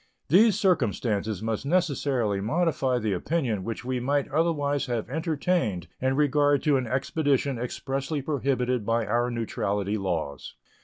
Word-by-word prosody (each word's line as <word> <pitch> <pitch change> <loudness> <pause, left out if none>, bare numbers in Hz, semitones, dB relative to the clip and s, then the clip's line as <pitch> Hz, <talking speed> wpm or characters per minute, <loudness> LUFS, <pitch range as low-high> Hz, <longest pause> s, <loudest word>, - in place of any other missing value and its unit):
These 205 +6 +5
circumstances 110 - 0
must 110 0 -2
necessarily 140 - 0
modify 135 - +1
the 110 -4 -1
opinion 115 - -1
which 115 +4 -5
we 130 0 -1
might 140 +3 0
otherwise 145 -2 0
have 120 -3 -2
entertained 155 - -1
in 130 +1 +1
regard 145 -1 +3
to 145 -3 +3
an 130 -2 -2
expedition 135 0 0
expressly 135 +4 -3
prohibited 130 -4 0
by 115 +1 0
our 120 +4 +1
neutrality 105 -3 -2
laws. 80 -7 -3
130 Hz, 135 wpm, -26 LUFS, 110-145 Hz, -, These